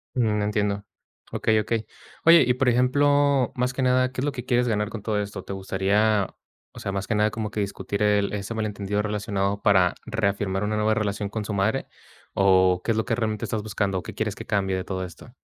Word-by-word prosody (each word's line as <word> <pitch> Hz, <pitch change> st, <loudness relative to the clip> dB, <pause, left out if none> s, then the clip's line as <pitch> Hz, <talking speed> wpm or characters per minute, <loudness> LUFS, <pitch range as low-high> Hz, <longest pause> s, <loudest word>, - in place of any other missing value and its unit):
Mm, 110 Hz, -4 st, +1 dB
entiendo. 105 Hz, -1 st, -1 dB, 0.5 s
Okey, 110 Hz, -1 st, +2 dB
okey. 115 Hz, 0 st, -2 dB, 0.4 s
Oye, 165 Hz, -3 st, +8 dB
y 125 Hz, -, +3 dB
por 125 Hz, 0 st, +2 dB
ejemplo, 140 Hz, +1 st, +3 dB
más 125 Hz, +1 st, 0 dB
que 130 Hz, -, -3 dB
nada, 130 Hz, 0 st, +3 dB
¿qué 130 Hz, -, -4 dB
es -, -, 0 dB
lo 145 Hz, -, 0 dB
que 125 Hz, -2 st, -7 dB
quieres 125 Hz, -1 st, +2 dB
ganar 105 Hz, -1 st, 0 dB
con 115 Hz, -3 st, -7 dB
todo 105 Hz, -1 st, -1 dB
esto? 100 Hz, -2 st, -5 dB
¿Te 100 Hz, -, -6 dB
gustaría, 100 Hz, +2 st, +1 dB, 0.4 s
o -, -, -12 dB
sea, 100 Hz, -, -3 dB
más 100 Hz, 0 st, -3 dB
que 110 Hz, -, 0 dB
nada 105 Hz, 0 st, +2 dB
como 110 Hz, -2 st, -3 dB
que 105 Hz, -, -4 dB
discutir 100 Hz, +1 st, -3 dB
el 105 Hz, -1 st, +2 dB
ese 100 Hz, +2 st, -4 dB
malentendido 105 Hz, -2 st, -2 dB
relacionado 100 Hz, -1 st, -2 dB
para 95 Hz, -3 st, +4 dB
reafirmar 100 Hz, -2 st, -1 dB
una 105 Hz, +1 st, -1 dB
nueva 105 Hz, +1 st, +2 dB
relación 105 Hz, -1 st, -2 dB
con 105 Hz, -1 st, -4 dB
su 105 Hz, -, -4 dB
madre 110 Hz, +7 st, 0 dB, 0.5 s
o 95 Hz, -2 st, +4 dB
qué 115 Hz, -, 0 dB
es 110 Hz, -, 0 dB
lo 110 Hz, -, 0 dB
que 115 Hz, -2 st, 0 dB
realmente 110 Hz, -3 st, -2 dB
estás 110 Hz, -2 st, -3 dB
buscando? 100 Hz, -3 st, -1 dB
¿Qué -, -, -8 dB
quieres -, -, -2 dB
que -, -, -8 dB
cambie 95 Hz, -2 st, 0 dB
de 95 Hz, -, -2 dB
todo 95 Hz, -1 st, -4 dB
esto? 90 Hz, +7 st, -11 dB
105 Hz, 220 wpm, -25 LUFS, 100-115 Hz, 0.5 s, Oye